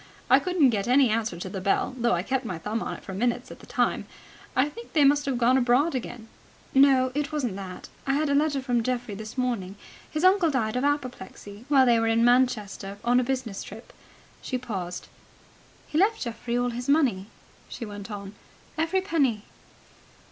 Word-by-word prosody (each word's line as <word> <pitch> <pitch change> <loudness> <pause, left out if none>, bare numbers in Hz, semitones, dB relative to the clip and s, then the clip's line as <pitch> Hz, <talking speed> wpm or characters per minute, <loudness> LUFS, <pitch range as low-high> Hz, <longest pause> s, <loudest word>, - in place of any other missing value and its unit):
I - - +8
couldn't 355 -8 +3
get 200 -2 -1
any 255 -1 +4
answer 220 -5 -1
to 180 - -6
the 190 0 -5
bell, 200 +6 +1
though 240 -3 +1
I 175 0 0
kept 265 +4 -1
my 185 -7 -4
thumb 210 +7 -3
on - - -4
it - - -13
for 190 - -7
minutes 240 +5 -1
at - - -11
a - - -15
time. - - 0 0.5
I 255 +3 +3
think 465 +10 -11
they 300 - +4
must 285 +1 +4
have 265 -3 0
gone 250 +2 +4
abroad 255 +6 +3
again." 240 -3 -5 0.5
"No, 265 -2 +5
it 295 +2 -2
wasn't 260 -10 -2
that. 185 -2 -8 0.2
I 275 - +2
had 305 +1 +1
a 280 - +1
letter 285 -2 +1
from 245 -3 +1
Geoffrey 245 -2 -2
this 215 +4 -8
morning. 230 -7 -2 0.3
His 310 +2 -3
uncle 370 -2 +5
died 230 -6 -1
of 250 - 0
apoplexy, 250 -6 -4
while 270 -3 +6
they 235 -2 +4
were 225 - +1
in 225 +1 +3
Manchester 215 -5 +1
on 245 +1 +3
a - - +1
business 245 -6 -3
trip." 220 +4 -11 0.5
She 255 - -3
paused. 190 -8 -5 0.8
"He 305 - -1
left 430 +4 +2
Geoffrey 235 0 -3
all 245 0 0
his 245 +3 -5
money," 255 -11 +2 0.4
she 235 - -6
went 205 0 -8
on. 200 -1 -7 0.5
"Every 330 +4 +1
penny." 280 - 0
245 Hz, 200 wpm, -26 LUFS, 215-275 Hz, 0.8 s, I